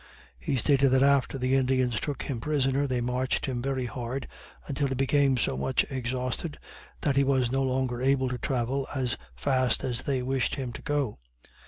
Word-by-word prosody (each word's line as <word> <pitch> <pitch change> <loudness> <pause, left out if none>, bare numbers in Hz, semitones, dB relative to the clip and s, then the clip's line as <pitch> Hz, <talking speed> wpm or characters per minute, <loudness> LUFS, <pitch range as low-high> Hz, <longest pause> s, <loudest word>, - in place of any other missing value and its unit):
He 65 - -1
stated 140 +1 +4
that 130 +1 +4
after 140 -1 +3
the 130 0 0
Indians 130 -3 +2
took 145 -3 -3
him 125 -5 -4
prisoner, 140 -1 +1
they 125 -2 0
marched 125 +2 0
him 130 -3 -2
very 130 -1 -1
hard, 125 +2 -4 0.4
until 140 0 -1
he 135 - -2
became 135 0 +3
so 115 - 0
much 65 0 +1
exhausted 130 +4 -3 0.4
that 140 -2 +1
he 140 - +5
was 130 -3 +2
no 135 +1 +1
longer 130 -2 0
able 130 0 +2
to 125 -1 -4
travel 130 +1 -1
as 125 -3 +1 0.2
fast 130 - +1
as 125 -3 -1
they 130 -3 -1
wished 130 0 0
him 130 -4 -4
to - - -8
go. 145 - -1
130 Hz, 185 wpm, -28 LUFS, 125-135 Hz, 0.4 s, he